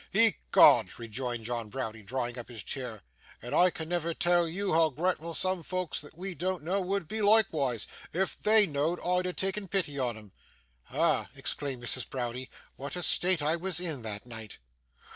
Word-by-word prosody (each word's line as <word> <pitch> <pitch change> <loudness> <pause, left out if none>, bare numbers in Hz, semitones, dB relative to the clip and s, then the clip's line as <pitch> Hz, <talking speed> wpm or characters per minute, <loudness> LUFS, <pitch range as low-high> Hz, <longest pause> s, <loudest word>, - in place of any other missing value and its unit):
'Ecod!' - - +5
rejoined 120 0 -5
John 115 -2 -3
Browdie, 110 -3 -5
drawing 120 +2 -3
up 120 - -8
his 115 -4 -6
chair; 120 -7 -5 0.4
'and 120 - -7
I 180 +1 +6
can 160 -2 -6
never 170 -1 -1
tell 175 -1 +3
YOU 190 +3 -2
hoo 160 0 +4
gratful 165 +2 -2
soom 185 +1 +2
folks 185 0 -3
that 150 +2 -13
we 190 +1 -5
do 185 +4 -2
know 180 +5 -1
would 190 -2 -2
be 220 - -4
loikewise, 160 - +3 0.3
if 185 +3 -1
THEY 215 0 +6
know'd 155 +1 -1
I 180 +1 +1
had 180 - -4
takken 195 0 -1
pity 165 -8 -1
on 120 -3 -1
him.' 105 -3 -14 0.6
'Ah!' - - +1
exclaimed 135 -4 -1
Mrs. 125 +1 -1
Browdie, 125 0 -4 0.3
'what 140 +1 -5
a 180 - -2
state 180 -1 +4
I 155 +3 +2
was 185 +1 -3
in 160 -7 -2
that 105 -1 -6
night! 110 -3 -9
155 Hz, 180 wpm, -29 LUFS, 120-180 Hz, 0.6 s, I